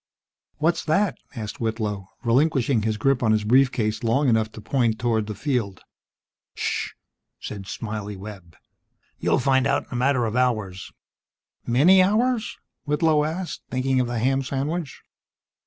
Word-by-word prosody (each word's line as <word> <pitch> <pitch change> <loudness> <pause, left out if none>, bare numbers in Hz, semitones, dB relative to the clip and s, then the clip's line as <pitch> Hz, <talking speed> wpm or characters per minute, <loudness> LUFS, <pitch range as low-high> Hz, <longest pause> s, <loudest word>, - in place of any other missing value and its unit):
"What's 165 +2 +1
that?" 185 +5 +1 0.2
asked 110 -3 -6
Whitlow, 110 -4 -2 0.2
relinquishing 130 -1 +2
his 110 0 -1
grip 135 +3 +2
on 110 -2 +3
his 110 -1 +2
brief 125 +4 +4
case 110 -3 -2
long 130 +5 +2
enough 110 -1 +2
to - - -9
point 115 -1 0
toward 115 -3 0
the 105 - -5
field. 115 -6 -2 0.7
"Ssssh!" - - -2 0.5
said 100 -2 -7
"Smiley" 105 -2 -5
Webb. 95 -5 -10 0.6
"You'll - - +2
find 135 0 +2
out 140 0 +1
in - - -27
a - - -4
matter 125 0 +2
of 110 0 -3
hours." 110 -8 -1 0.8
"Many 160 +11 +6
hours?" 220 +3 +1 0.3
Whitlow 150 0 +2
asked, 170 +3 -4
thinking 130 0 0
of 125 - +1
the 120 0 -3
ham 135 +4 +1
sandwich. 140 +4 -3
125 Hz, 150 wpm, -24 LUFS, 110-140 Hz, 0.8 s, Many